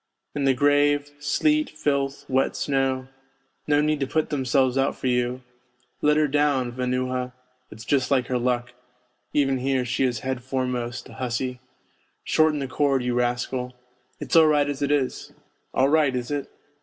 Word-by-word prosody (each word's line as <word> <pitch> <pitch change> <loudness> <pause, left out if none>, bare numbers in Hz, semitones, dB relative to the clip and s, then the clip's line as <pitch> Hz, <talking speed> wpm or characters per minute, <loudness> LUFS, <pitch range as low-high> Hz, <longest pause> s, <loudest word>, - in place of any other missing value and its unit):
In 145 -1 -1
the 135 -1 +3
grave 145 +1 +2
sleet, 300 - +1
filth, 140 -2 -2
wet 130 0 +1
snow 135 -2 0 0.6
no 145 0 +3
need 150 0 +1
to 135 - -1
put 155 +3 -1
themselves 130 -2 +1
out 135 0 +1
for - - -9
you 125 0 0 0.3
' 120 0 -42
Let 150 0 +3
her 155 -1 +3
down, 140 -3 +1
Vanuha; 125 0 -2 0.4
it's 110 +1 -11
just 135 -1 +1
like 130 -3 +2
her 125 -1 -1
luck 125 0 -1 0.6
even 135 -2 +1
here, 130 -1 0
she 130 +2 0
is 120 -4 0
head 130 -2 -3
foremost, 125 -2 -3
the - - -13
hussy. 125 0 -3 0.6
Shorten 155 -1 +2
the 140 -2 -3
cord, 135 -1 +1
you 125 0 -1
rascal.' 125 +1 -1 0.2
' 125 0 -41
It's - - -3
all 160 -1 +8
right 145 -1 +3
as 145 -1 -4
it 140 - 0
is.' 145 -3 -1 0.2
' - - -45
All 135 +1 +3
right, 150 -4 +3
is 125 +2 -3
it 145 -2 -3
130 Hz, 180 wpm, -24 LUFS, 125-145 Hz, 0.6 s, all